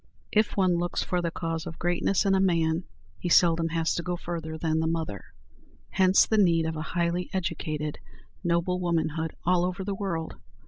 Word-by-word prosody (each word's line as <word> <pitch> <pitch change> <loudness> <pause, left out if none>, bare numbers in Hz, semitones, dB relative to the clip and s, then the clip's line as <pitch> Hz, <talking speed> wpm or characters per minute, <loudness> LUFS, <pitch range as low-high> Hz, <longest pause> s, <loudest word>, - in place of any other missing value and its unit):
If 215 0 +2
one 185 -3 +3
looks 175 0 -1
for 180 -1 -1
the 170 - -1
cause 165 0 -4
of 165 - -7
greatness 175 +3 +1
in 195 - +3
a 190 - +3
man, 170 -2 +2 0.3
he 175 - -3
seldom 165 -1 +4
has 165 0 0
to - - -2
go 180 +1 -2
further 165 -2 -5
than 160 0 0
the 160 - 0
mother. 160 -11 -3 0.7
Hence 190 0 +5
the 220 - +2
need 170 -4 +4
of 160 0 -2
a 155 - -4
highly 170 +2 -1
educated, 155 -5 -3 0.4
noble 175 +1 +1
womanhood 160 -2 -1
all 175 0 +3
over 185 +2 -2
the 200 +1 -2
world. 190 -5 -3
170 Hz, 185 wpm, -27 LUFS, 160-180 Hz, 0.7 s, Hence